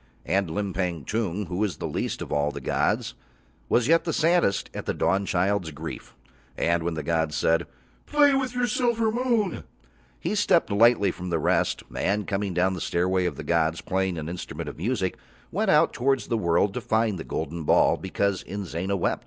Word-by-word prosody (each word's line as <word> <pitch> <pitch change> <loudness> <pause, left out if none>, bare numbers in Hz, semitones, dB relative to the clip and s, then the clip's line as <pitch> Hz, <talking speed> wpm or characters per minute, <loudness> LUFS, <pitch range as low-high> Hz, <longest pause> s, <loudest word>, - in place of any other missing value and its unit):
And 95 -1 +1
Limpang 90 -3 -2
Tung, 105 -3 -2
who 90 +1 -5
was 105 -2 -1
least - - -3
of - - -10
all 75 0 +1
the 75 - -6
gods, - - 0 0.6
was 120 0 +3
yet 165 +2 +4
the 165 - -1
saddest 165 - +2
at - - -6
the - - -1
Dawnchild's 95 -1 +1
grief, 80 +2 -8 0.4
and 85 0 +1
when 85 0 -2
the 80 - -4
gods 80 -2 0
said: 85 +1 +2 0.4
"Play 290 -1 +5
with 260 -2 -1
your 245 0 +2
silver 230 -1 +1
moon," 235 -4 0 0.6
he - - -2
stepped 190 - +2
lightly 105 -2 +4
from 90 +1 -7
the 85 - +1
rest, 80 - +1
and 100 +1 0
coming 100 -2 -2
down 95 +1 +2
the 90 - -5
stairway 90 +1 +1
of - - -3
the - - -7
gods, 80 -1 +1
playing 95 -2 -1
an 80 -1 -5
instrument 90 +1 -6
of - - -7
music, 95 -1 -1 0.3
went - - 0
out - - +4
towards 135 +2 0
the 120 - +1
world 90 +2 +2
to 125 - -3
find 110 -5 0
the - - -5
golden 85 +2 -4
ball - - +4
because 95 0 -1
Inzana 95 0 -3
wept. 90 - 0
95 Hz, 185 wpm, -26 LUFS, 85-120 Hz, 0.6 s, Play